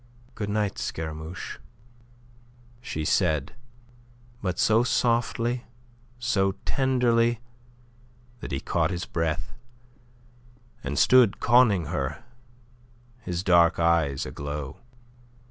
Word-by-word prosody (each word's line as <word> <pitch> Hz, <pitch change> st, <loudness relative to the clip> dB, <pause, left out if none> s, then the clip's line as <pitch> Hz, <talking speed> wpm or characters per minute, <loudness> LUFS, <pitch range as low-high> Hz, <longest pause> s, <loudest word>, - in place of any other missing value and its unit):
"Good 105 Hz, -3 st, -4 dB
night, 105 Hz, -1 st, -1 dB
Scaramouche," 80 Hz, +2 st, -5 dB, 1.2 s
she 80 Hz, -11 st, -4 dB
said, 75 Hz, -5 st, +1 dB, 0.9 s
but 90 Hz, -2 st, -2 dB
so 110 Hz, +1 st, +4 dB
softly, 120 Hz, 0 st, 0 dB, 0.5 s
so 105 Hz, -6 st, +1 dB
tenderly, 120 Hz, -3 st, +2 dB, 1.0 s
that -, -, -7 dB
he 70 Hz, -, -1 dB
caught 80 Hz, -2 st, 0 dB
his 90 Hz, -1 st, -3 dB
breath, 80 Hz, -2 st, -2 dB, 1.3 s
and -, -, -3 dB
stood 125 Hz, -5 st, +5 dB
conning 110 Hz, -8 st, +4 dB
her, 75 Hz, -, -3 dB, 1.0 s
his 90 Hz, -6 st, -4 dB
dark 85 Hz, -3 st, +4 dB
eyes 85 Hz, -5 st, +2 dB
aglow. 70 Hz, -1 st, -6 dB
90 Hz, 90 wpm, -26 LUFS, 80-115 Hz, 1.3 s, stood